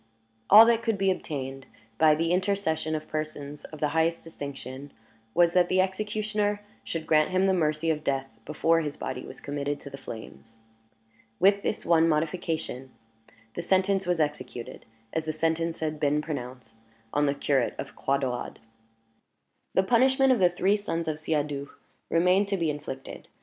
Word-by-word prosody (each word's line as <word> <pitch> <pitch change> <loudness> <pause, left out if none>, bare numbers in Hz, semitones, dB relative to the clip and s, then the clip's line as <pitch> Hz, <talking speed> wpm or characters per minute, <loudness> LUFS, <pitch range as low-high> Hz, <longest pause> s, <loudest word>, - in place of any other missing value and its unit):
All 215 +3 +10
that 230 -1 +3
could 225 -3 0
be 195 0 +2
obtained, 135 -6 -5 0.3
by 155 -1 +6
the 165 +2 0
intercession 180 -4 0
of 155 - -5
persons 150 -2 -5
of 155 - -10
the 150 - +1
highest 160 +2 +1
distinction, 140 -3 -8 0.4
was, 175 -1 +4
that 180 -1 +4
the 185 - +2
executioner 210 +2 -1 0.2
should 165 -1 -4
grant 155 -1 +3
him 185 +1 +2
the 190 - +3
mercy 160 -2 +1
of 155 -1 -3
death 135 -2 -1 0.2
before 165 +3 +2
his 150 -2 -4
body 130 0 -5
was - - -10
committed 145 0 -3
to 140 - -10
the 135 - -8
flames. 115 -2 -10 0.8
With 200 +1 +4
this - - -3
one 165 -1 +4
modification, 155 -4 -2 0.6
the - - -4
sentence 190 +1 +1
was 175 -2 +1
executed, 130 -6 -4 0.3
as 160 -1 -1
the 155 - -2
sentence 165 +1 -1
had 155 -1 -2
been 150 0 +2
pronounced, 125 -6 -6 0.4
on 145 0 +2
the 140 - +1
curate 140 -3 +1
of - - -7
Croix 140 +1 +1
Daurade. 130 -3 -3 1.2
The 190 - +4
punishment 260 +5 +4
of 245 - 0
the 180 -2 +5
three 190 +4 +2
sons 170 -5 -3
of 155 -1 -2
Siadoux 145 -3 -2 0.4
remained 180 +4 +3
to 200 -1 0
be 165 -3 +1
inflicted. 145 -2 -8
160 Hz, 165 wpm, -27 LUFS, 145-185 Hz, 1.2 s, All